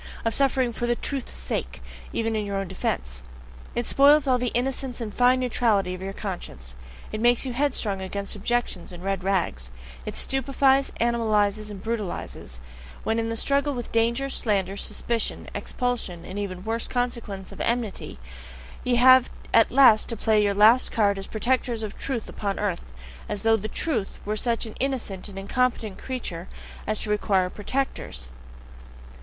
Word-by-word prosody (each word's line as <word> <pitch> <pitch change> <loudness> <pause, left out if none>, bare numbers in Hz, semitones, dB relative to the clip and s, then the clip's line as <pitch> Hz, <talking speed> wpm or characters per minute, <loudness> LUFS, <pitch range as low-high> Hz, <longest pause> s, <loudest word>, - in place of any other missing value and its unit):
Of 225 - +2
suffering 265 -3 +2
"for 240 - -2
the 240 - +2
truth's 270 +1 -2
sake"! - - -3 0.3
even 225 -1 -1
in 215 - 0
your 200 -1 -3
own 195 -1 -1
defense! 65 - -2 0.5
It 240 - 0
spoils 285 +3 +6
all 255 -2 +3
the 250 - 0
innocence 255 0 -1
and 220 -3 -4
fine 250 +1 +4
neutrality 220 -7 +1
of 185 - -7
your 195 +1 -3
conscience; 175 - -6 0.4
it 215 - -3
makes 240 +2 +3
you 255 - -3
headstrong 240 -7 0
against 200 +2 -3
objections 210 -4 -1
and 175 0 -9
red 195 -1 -1
rags; 170 - 0 0.4
it - - -4
stupefies, 270 0 +3
animalizes, 215 -3 +2
and 200 -2 -8
brutalizes, 205 - -4 0.4
when 225 +1 +1
in 225 0 -1
the 225 - -2
struggle 280 +3 +1
with 240 -2 -5
danger, 235 +4 +2
slander, 200 -7 0
suspicion, 230 +2 -2
expulsion, 235 -9 -2
and 195 +2 -5
even 185 -2 -4
worse 230 +1 -1
consequences 235 -6 -3
of - - -7
enmity, 235 -4 -2 0.7
ye 250 -1 +2
have 255 +1 +7 0.2
at 230 - +6
last 250 -5 +6
to 230 - -2
play 215 0 +3
your 200 -1 +2
last 220 +5 +6
card 200 -3 +2
as 195 - -6
protectors 235 0 0
of 210 - -5
truth 250 -5 -3
upon 200 -2 -3
earth 200 -4 -1 0.5
as 200 - -3
though 225 0 +5
"the 215 -1 -3
Truth" 225 -4 -1
were 210 +1 -1
such 235 +2 0
an 220 - -8
innocent 240 -8 -2
and 195 - -10
incompetent 220 0 0
creature 195 -9 -5 0.4
as 215 +1 +1
to 210 - -2
require 195 -3 +2
protectors! 205 - -3
225 Hz, 165 wpm, -25 LUFS, 195-245 Hz, 0.7 s, have